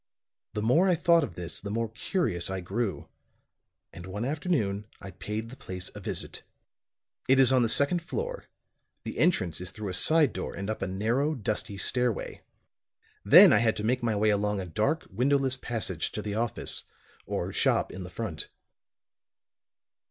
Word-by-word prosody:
The 105 - -2
more 160 - +4
I 180 - +4
thought 170 0 +4
of - - -5
this, 85 -2 -6
the 100 - -6
more 115 +2 -1
curious 115 - -1
I 95 0 -3
grew; 100 +3 -3 0.9
and 85 +2 -9
one 105 +5 -4
afternoon 130 - -1
I 95 - -9
paid 105 +5 -5
the 130 - -10
place 90 -6 -6
a 105 - -8
visit. 95 - -5 0.9
It 135 - +6
is 130 -1 +6
on 130 -1 +4
the 115 - +2
second 145 +8 +3
floor, 485 - -4 0.6
the - - -6
entrance 90 - +2
is 90 - -3
through 105 +1 -6
a - - -4
side 150 - +3
door - - -5
and 100 +2 -3
up 110 - -5
a 95 - -1
narrow, 115 +11 0
dusty 105 -2 -3
stairway. 120 +2 -1 0.8
Then - - +9
I - - +6
had 115 -1 +2
to 105 - -4
make 125 +3 +1
my 115 -2 0
way 105 +1 +3
along 105 0 0
a 95 - -4
dark 105 - -1
windowless 130 +4 +2
passage 110 -9 -3
to 105 - -4
the 105 - -3
office, 115 +1 -2 0.4
or - - -3
shop - - +1
in 95 - -7
the 90 - -8
front. 90 -5 -5
110 Hz, 175 wpm, -28 LUFS, 95-130 Hz, 0.9 s, Then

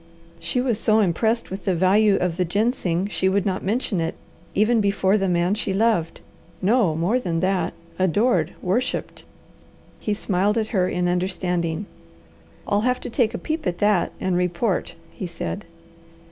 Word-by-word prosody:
She 170 +9 -1
was 245 -5 0
so 215 0 +3
impressed 220 +4 +1
with 190 0 -6
the 190 - +2
value 195 +4 +4
of 180 -3 0
the 185 - +2
ginseng 190 -2 0
she 190 -1 0
would 195 0 +1
not 190 -2 -1
mention 205 -3 0
it, 165 0 -2 0.4
even 220 +2 +3
before 200 -1 +2
the 195 -2 +1
man 175 +2 +2
she 195 -2 -1
loved 205 -6 +1 0.4
no 200 -5 +2
more 180 +10 +1
than 170 -8 -2
that 185 0 0 0.3
"adored" 185 - +2
"worshipped!" 205 +8 -2 0.7
He 210 - -1
smiled 200 +2 0
at 220 -1 0
her 185 -5 +1
in 180 0 0
understanding. 180 -1 -1 0.8
"I'll 205 0 +2
have 250 +2 +1
to - - -6
take 230 -2 +1
a - - -1
peep 315 - -3
at 175 -1 -1
that 205 -3 +2
and 185 -1 0
report," 180 +3 0 0.2
he 185 - -6
said. 175 +4 -5
195 Hz, 165 wpm, -23 LUFS, 180-215 Hz, 0.8 s, value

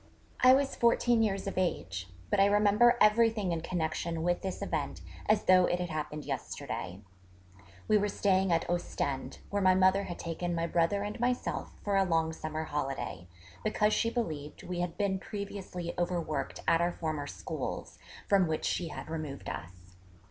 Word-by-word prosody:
I 255 +1 +8
was 275 0 0
fourteen 235 0 +3
years 195 -3 0
of 195 -1 -2
age: 95 - -2 0.2
but - - +3
I 195 - +6
remember 210 +4 +5
everything 215 -2 +4
in 165 -1 -1
connection 165 -1 -2
with 175 0 +1
this 190 -1 -4
event - - -2 0.3
as 215 0 +3
though 185 -1 +6
it 175 - 0
had 175 -2 -3
happened 150 -1 -4
yesterday. 100 -8 -5 0.9
We 215 - +5
were 205 - +1
staying 190 -2 +2
at 165 -1 +1
Ostend, 155 -5 -2
where 205 0 0
my 185 -1 +5
mother 190 +1 +4
had 175 - -6
taken 175 +1 -3
my 165 0 0
brother 170 +4 +1
and 210 +3 -5
myself 245 +1 -1
for 200 -1 +1
a 195 - +5
long 165 -3 +1
summer 155 0 -4
holiday, 135 - -4 0.4
because 210 0 +2
she 230 - +2
believed 155 - -4
we 180 -1 -4
had 175 -1 -2
been 195 -2 0
previously 195 -4 -5
overworked 175 -3 -2
at 165 - +4
our 175 0 +1
former 155 -3 -3
schools, - - -5 0.3
from 195 -3 +4
which 155 -1 -1
she 175 - 0
had - - -7
removed 155 -3 -5
us. 90 +1 -10
175 Hz, 170 wpm, -31 LUFS, 160-205 Hz, 0.9 s, I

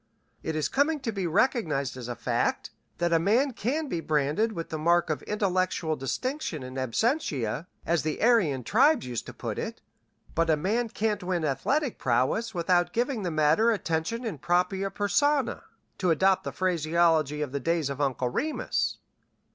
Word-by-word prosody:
It 160 - -3
is 155 - 0
coming 295 +3 +1
to 240 -4 -2
be 195 -4 -2
recognized 160 - +1
as 125 -2 -7
a 120 - -4
fact - - -1 0.3
that 175 -1 +1
a 165 - +5
man 235 - +2
can 280 +8 -2
be 175 - -2
branded 155 +8 +1
with 165 -4 -5
the 155 - -4
mark 170 +1 +3
of 155 - -2
intellectual 185 -5 0
distinction 165 - -3
in 130 0 -8
absentia, 135 - -1 0.2
as 170 -1 +1
the 155 -1 -3
Aryan 195 - +3
tribes 265 - +3
used 120 -2 -4
to - - -8
put - - -4
it, - - -5 0.5
but 165 0 +1
a 155 - +4
man 220 +9 0
can't 215 -2 -1
win 180 -3 -1
athletic 265 - 0
prowess 130 - 0
without 175 0 +2
giving 240 0 0
the 180 - -1
matter 155 +8 +3
attention 205 +2 -1
in 190 -11 -4
propria 180 +4 +1
persona, 270 +9 +1 0.4
to 185 - +1
adopt 190 +4 +3
the - - -3
phraseology 165 -4 +1
of 140 - -5
the 140 - -2
days 160 -1 0
of 140 +1 -4
Uncle 130 -3 0
Remus. 300 - -1
175 Hz, 170 wpm, -27 LUFS, 150-225 Hz, 0.5 s, a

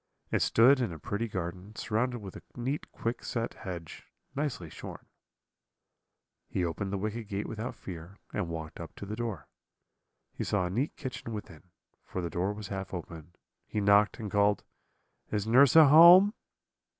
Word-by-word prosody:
It - - +1
stood 130 +4 +5
in 120 - -1
a 80 - -7
pretty 100 +9 -3
garden, 95 +1 -5
surrounded 120 +2 -1
with 95 -2 -9
a - - -9
neat 130 +5 -3
quickset 115 0 -3
hedge, 85 -4 -8 0.3
nicely 135 - -2
shorn. 80 - -9 1.4
"He 90 - -1
opened 95 +4 -3
the 100 - -1
wicket 110 +2 -4
gate 100 0 -3
without 110 +2 -5
fear, 90 +2 -9 0.2
and 95 -5 -2
walked 80 -1 -6
up 85 -2 -8
to - - -7
the 105 +2 -5
door. 115 -3 -4 0.9
He - - -4
saw 100 -3 0
a 90 - -3
neat 125 +10 -1
kitchen 125 -4 -6
within, 90 -5 -9 0.3
for - - -6
the 85 - -3
door 90 +5 0
was 105 0 -7
half 95 -1 -5
open; 85 0 -9 0.3
he 105 - -2
knocked, 100 +1 +4
and 105 -3 -5
called, 100 0 +2 0.7
'Is 105 -1 -1
nurse 125 +5 +6
at 160 -3 +9
home?' 175 +7 +9
105 Hz, 165 wpm, -30 LUFS, 90-120 Hz, 1.4 s, at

